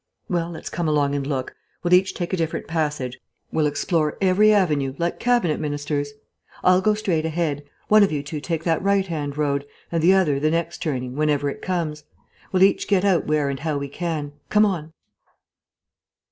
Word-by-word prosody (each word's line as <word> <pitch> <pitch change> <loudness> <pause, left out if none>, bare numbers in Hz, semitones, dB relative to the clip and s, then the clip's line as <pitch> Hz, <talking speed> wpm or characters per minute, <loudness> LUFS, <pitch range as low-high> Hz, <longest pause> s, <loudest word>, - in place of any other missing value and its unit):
"Well, 170 -2 -1
let's 160 -2 -7
come 170 -2 -2
along 145 -2 +2
and 140 -1 -2
look. 135 -3 -3 0.3
We'll 175 0 +2
each 190 +2 +4
take 175 0 -4
a - - +4
different 165 -3 -2
passage; 150 -6 -2 0.3
we'll 155 -1 +2
explore 150 +1 0
every 195 +3 +4
avenue, 150 -10 +2
like 170 0 -2
Cabinet 240 -11 +2
Ministers. 145 -1 -2 0.5
I'll 185 0 +5
go 215 +2 +3
straight 180 -7 0
ahead; 160 -3 -2 0.2
one 215 0 +6
of 200 - +4
you 145 -2 -2
two 145 +1 -5
take 165 0 -3
that 165 -2 +1
right 200 0 +2
hand 150 -5 -4
road, 140 -2 0 0.3
and 165 -1 0
the 180 +4 +6
other 155 -8 +2
the 155 +2 +2
next 165 +1 -1
turning, 130 -7 -3
whenever 145 -1 +1
it - - -10
comes. 160 -5 -2 0.5
We'll 185 0 +4
each 195 - +3
get 200 -1 +2
out 190 -4 +2
where 150 -1 +1
and 140 -1 -3
how 155 0 -1
we 140 0 -4
can. 155 -2 -3 0.2
Come 210 0 +5
on." 165 -6 -2
160 Hz, 190 wpm, -23 LUFS, 145-180 Hz, 0.5 s, one